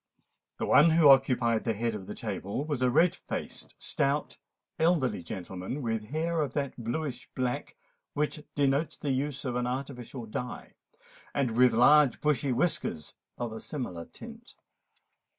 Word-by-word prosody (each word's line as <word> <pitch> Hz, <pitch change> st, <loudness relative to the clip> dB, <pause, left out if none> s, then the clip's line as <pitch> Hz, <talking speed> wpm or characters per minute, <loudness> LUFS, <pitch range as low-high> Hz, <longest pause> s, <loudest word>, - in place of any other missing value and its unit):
The -, -, -2 dB
one 160 Hz, +4 st, +6 dB
who 160 Hz, -2 st, +6 dB
occupied 125 Hz, -4 st, +4 dB
the 115 Hz, -, 0 dB
head 115 Hz, +2 st, -1 dB
of 95 Hz, -3 st, -7 dB
the 105 Hz, -, -6 dB
table 105 Hz, +3 st, -3 dB
was 145 Hz, -5 st, -2 dB
a 125 Hz, -, +4 dB
red 165 Hz, +8 st, +4 dB
faced, -, -, -6 dB
stout, 140 Hz, +2 st, -1 dB, 0.4 s
elderly 160 Hz, -, +2 dB
gentleman, 95 Hz, -, -6 dB
with 115 Hz, -2 st, -2 dB
hair 160 Hz, +5 st, -1 dB
of 140 Hz, -4 st, -2 dB
that 140 Hz, -2 st, -2 dB
blueish 125 Hz, +2 st, -4 dB
black 125 Hz, -, -2 dB, 0.4 s
which 150 Hz, 0 st, -1 dB
denotes 140 Hz, +2 st, +1 dB
the 145 Hz, -, -2 dB
use 140 Hz, +2 st, -2 dB
of 125 Hz, -2 st, -2 dB
an 125 Hz, 0 st, 0 dB
artificial 125 Hz, -2 st, -5 dB
dye, 120 Hz, +3 st, -6 dB, 0.6 s
and 135 Hz, -4 st, +1 dB
with 125 Hz, 0 st, +6 dB
large 140 Hz, +3 st, +6 dB
bushy 145 Hz, -3 st, +1 dB
whiskers 120 Hz, -, -1 dB, 0.2 s
of 120 Hz, -2 st, -3 dB
a 110 Hz, -, -6 dB
similar 100 Hz, -, -5 dB
tint. 235 Hz, +1 st, -12 dB
130 Hz, 150 wpm, -29 LUFS, 115-150 Hz, 0.6 s, one